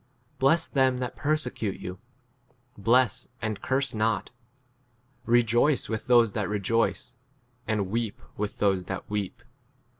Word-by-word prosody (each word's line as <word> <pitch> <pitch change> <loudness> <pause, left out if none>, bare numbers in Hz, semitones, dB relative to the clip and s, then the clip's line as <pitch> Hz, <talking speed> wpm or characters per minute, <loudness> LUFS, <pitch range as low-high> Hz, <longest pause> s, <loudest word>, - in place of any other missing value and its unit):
Bless 160 +5 +3
them 130 -2 +2
that 125 -1 -4
per 150 +2 +1
secute 125 -9 -3
you; 90 +1 -7 0.8
bless, 120 +4 +2
and 110 -2 -3
curse 130 -1 0
not. 110 -2 0 1.0
15 120 +1 +5
Eejoice 120 +6 +2
with 110 +3 -3
those 120 -3 +5
that 100 -2 -2
rejoice, 115 +4 0 0.5
and 105 -4 -1
weep 115 -2 -2 0.2
with 105 0 -3
those 95 -3 +1
that 95 0 -5
weep. 105 -2 -3
115 Hz, 130 wpm, -27 LUFS, 105-125 Hz, 1.0 s, 15